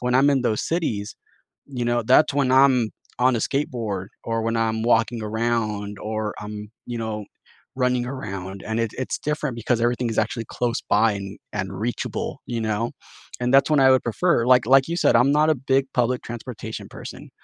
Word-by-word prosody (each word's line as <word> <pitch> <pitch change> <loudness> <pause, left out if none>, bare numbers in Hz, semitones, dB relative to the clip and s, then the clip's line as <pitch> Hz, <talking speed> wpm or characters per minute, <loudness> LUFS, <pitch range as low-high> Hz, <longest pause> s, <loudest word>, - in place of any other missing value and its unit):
when 125 0 0
I'm 140 +2 +5
in 135 -2 +2
those 110 -3 0
cities, 115 - -2 0.5
you 125 -4 -4
know, 120 0 +1
that's 130 +6 +4
when 140 -3 +2
I'm 130 -4 +5 0.3
on 125 -1 +3
a - - -1
skateboard 115 -9 -2 0.2
or 115 0 -1
when 115 0 0
I'm 110 -1 0
walking 115 0 +2
around 105 -2 -2
or, 110 0 -3
um, 105 0 -7 0.2
you 120 -1 -4
know, 110 -2 -4 0.5
running 125 -1 +1
around. 95 -7 -6
And 110 +1 -1
it 115 -2 0
it's 130 - -2
different 150 -3 -2
because 115 +1 0
everything 120 0 +1
is 110 - -3
actually 115 +1 0
close 120 -1 -2
by, 110 +2 +4
an 100 0 -6 0.2
and 95 -2 -3
reachable, 120 +3 -3
you 120 -2 -3
know? 110 +2 -1 0.5
And, 125 +2 +1
that's 140 - +5
when 150 - +4
I 130 0 +6
would 130 - +3
prefer, 120 +1 +1
like 125 -2 +5
like 135 +2 +5
you 170 - -2
said, 160 - +3
I'm 125 +4 +4
not 150 +1 +3
a - - +4
big 135 +1 +1
public 125 0 +1
transportation 115 -1 -7
person, - - -10
120 Hz, 195 wpm, -23 LUFS, 110-130 Hz, 0.5 s, I